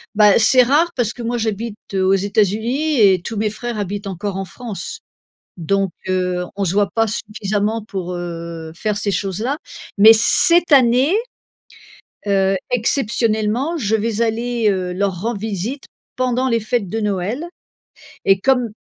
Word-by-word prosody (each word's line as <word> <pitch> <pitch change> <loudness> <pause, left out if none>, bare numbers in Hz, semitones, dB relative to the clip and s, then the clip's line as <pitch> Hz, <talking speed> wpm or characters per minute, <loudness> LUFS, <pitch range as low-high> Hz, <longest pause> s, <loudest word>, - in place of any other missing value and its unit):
Bah, 210 -1 +5
c'est 250 +3 +5
rare 305 +7 +2
parce 235 -4 0
que 245 - -10
moi 240 +1 -2
j'habite, 220 0 -3 0.2
heu, 190 -1 +1
aux 190 - +4
États-Unis 220 +8 +1
et 190 -4 +5
tous 220 +5 -6
mes 210 +1 0
frères 235 +2 -5
habitent 205 0 -4
encore 195 +1 -4
en 195 - -3
France. 230 - -7 0.6
Donc 195 +2 0 0.2
heu, 180 -1 -1
on 200 - -2
se 180 - 0
voit 205 -1 +2
pas 225 +2 +1
suffisamment 210 +1 -2
pour, 190 -4 -5
heu, 170 -2 -6
faire 210 +4 -2
ces 200 0 -1
choses-là. 210 - -2 0.4
Mais 215 +2 +9
cette 340 +9 +4
année, 260 +3 +5 1.1
heu, 195 -1 +2 0.2
exceptionnellement, 230 +2 0
je 220 -6 0
vais 220 +1 -2
aller, 230 0 0
heu, 185 -2 -2
leur 190 -2 -1
rendre 225 +2 -3
visite 220 +6 -4 0.3
pendant 255 0 0
les 230 -3 +1
fêtes 215 -2 -1
de 225 +5 -3
Noël 210 - -2 0.8
et 195 -1 +3
comme 250 -1 +2
215 Hz, 155 wpm, -19 LUFS, 195-240 Hz, 1.1 s, Mais